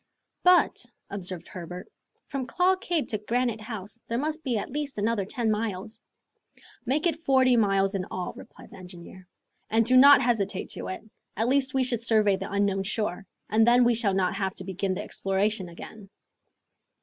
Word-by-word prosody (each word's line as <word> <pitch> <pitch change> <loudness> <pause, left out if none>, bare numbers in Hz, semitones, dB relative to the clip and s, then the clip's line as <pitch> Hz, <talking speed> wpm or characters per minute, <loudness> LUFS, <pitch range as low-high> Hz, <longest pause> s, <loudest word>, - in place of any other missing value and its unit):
"But," 360 0 +4 0.3
observed 185 -3 -6
Herbert, 180 0 -8 0.4
"from 270 -3 -4
Claw 360 +9 +2
Cape 345 -4 -2
to 215 - -2
Granite 235 +1 -1
House 215 0 -8
there 230 - -2
must 310 +4 -3
be 245 -5 0
at 205 - -4
least 290 -2 -4
another 210 -1 0
ten 225 +2 -1
miles. 215 0 -4 0.9
"Make 290 +6 +1
it 330 -3 +1
forty 260 -5 +3
miles 195 -3 +2
in 190 -2 -2
all," 180 -2 -5
replied - - -14
the - - -12
engineer, 180 0 -12 0.4
"and 225 +1 +3
do 255 +3 +4
not 280 +2 +9
hesitate 205 -5 -1
to - - -5
do - - -5
it. 185 - -6 0.3
At 225 +3 +1
least 270 0 +1
we 265 - +3
should 240 -3 -2
survey 215 -3 +3
the - - -6
unknown 200 -1 +1
shore, 195 -1 -3 0.2
and 220 +2 +3
then 245 +1 +6
we 240 0 +4
shall 215 -4 +1
not 190 -1 +1
have 190 -2 -2
to - - -6
begin 190 0 -2
the - - -4
exploration 195 0 -1
again." 195 +4 -11
220 Hz, 185 wpm, -26 LUFS, 195-250 Hz, 0.9 s, not